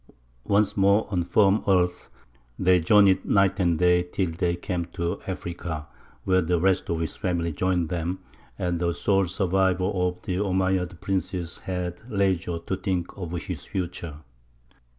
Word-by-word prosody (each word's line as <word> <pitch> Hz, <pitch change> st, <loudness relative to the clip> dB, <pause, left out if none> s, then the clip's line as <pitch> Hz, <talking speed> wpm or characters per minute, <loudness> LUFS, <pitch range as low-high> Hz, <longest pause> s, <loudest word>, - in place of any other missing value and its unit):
Once 100 Hz, 0 st, +2 dB
more 100 Hz, +2 st, +4 dB
on 90 Hz, -3 st, +1 dB
firm 100 Hz, +3 st, +3 dB
earth, 90 Hz, -2 st, +1 dB, 0.5 s
they 90 Hz, -1 st, +4 dB
journeyed 95 Hz, +2 st, +5 dB
night 100 Hz, 0 st, +2 dB
and 85 Hz, -3 st, +2 dB
day 90 Hz, 0 st, +4 dB
till 90 Hz, 0 st, -2 dB
they 85 Hz, +1 st, 0 dB
came 90 Hz, 0 st, -3 dB
to 85 Hz, +2 st, -4 dB
Africa, 85 Hz, -4 st, -5 dB, 0.4 s
where 95 Hz, -1 st, +3 dB
the 85 Hz, 0 st, +1 dB
rest 95 Hz, +1 st, +1 dB
of 85 Hz, -, 0 dB
his 80 Hz, -3 st, -3 dB
family 85 Hz, -2 st, -1 dB
joined 90 Hz, 0 st, 0 dB
them, 90 Hz, +2 st, -2 dB, 0.4 s
and 90 Hz, -1 st, -1 dB
the 85 Hz, -1 st, 0 dB
sole 95 Hz, 0 st, +2 dB
survivor 95 Hz, 0 st, +1 dB
of 90 Hz, -2 st, 0 dB
the 90 Hz, -, -2 dB
Omeyyad 95 Hz, -2 st, 0 dB
princes 90 Hz, -3 st, -3 dB
had 90 Hz, -1 st, -4 dB
leisure 95 Hz, -5 st, 0 dB
to 95 Hz, -, -1 dB
think 90 Hz, -2 st, -2 dB
of 90 Hz, -3 st, -6 dB
his -, -, -6 dB
future. 85 Hz, -4 st, -4 dB
90 Hz, 150 wpm, -25 LUFS, 85-95 Hz, 0.5 s, journeyed